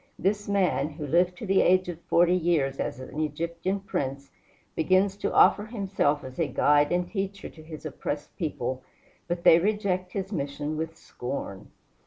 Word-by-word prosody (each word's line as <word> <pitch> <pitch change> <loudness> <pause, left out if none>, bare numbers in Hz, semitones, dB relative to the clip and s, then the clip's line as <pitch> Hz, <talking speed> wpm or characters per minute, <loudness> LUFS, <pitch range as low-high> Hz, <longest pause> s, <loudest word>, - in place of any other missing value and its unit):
This 205 +2 -1
man, 190 -6 +1
who 150 0 -7
lived 175 +4 +2
to 220 - -6
the 195 -1 +4
age 185 0 +4
of 170 -1 -6
forty 175 +1 +3
years 160 -6 +1
as - - -3
an 130 +3 -7
Egyptian 170 +5 -2
prince, 140 -7 -4 0.4
begins 185 +4 +3
to - - -2
offer 205 +2 +5
himself 195 -10 0
as 130 +2 -9
a 165 - +2
guide 145 0 +3
and 175 0 +1
teacher 195 0 -4
to 160 - -14
his 155 0 -10
oppressed 145 0 -5
people, 130 -6 -3 0.5
but 175 0 -3
they 165 - +8
reject 185 -2 -1
his 195 0 -3
mission 145 -2 -3
with 160 +1 -4
scorn. 120 -6 -6
170 Hz, 170 wpm, -27 LUFS, 145-190 Hz, 0.5 s, they